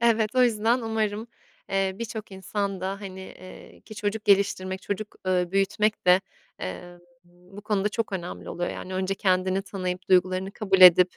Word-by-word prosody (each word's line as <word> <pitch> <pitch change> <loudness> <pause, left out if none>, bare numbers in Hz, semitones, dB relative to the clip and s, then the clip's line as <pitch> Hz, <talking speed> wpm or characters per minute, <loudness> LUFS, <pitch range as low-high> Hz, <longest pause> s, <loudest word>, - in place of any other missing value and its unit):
Evet, 230 0 +2
o 255 - +5
yüzden 230 +1 +2
umarım, 220 -1 -2 0.4
eee, 195 -1 +1
bir 235 - -2
çok 215 -2 -7
insan 195 0 -3
da, 195 +2 -3
hani, 190 -2 -8
eee, 185 0 -12
ki 215 - -12
çocuk 210 +1 -3
geliştirmek, 190 -2 +2
çocuk, 210 +1 -5
ııı, 180 -1 +1
büyütmek 195 +1 +1
de, 180 +1 +7 0.4
eee, 175 - -7 0.3
bu 180 +3 -15
konuda 210 -1 0
çok 215 -1 -3
önemli 180 -2 -5
oluyor. 175 - -3
Yani 185 0 -7
önce 190 +1 -1
kendini 185 0 +1
tanıyıp 185 -1 -5
duygularını 185 +1 +3
kabul 195 -3 0
edip 180 0 +8
195 Hz, 165 wpm, -26 LUFS, 185-210 Hz, 0.4 s, edip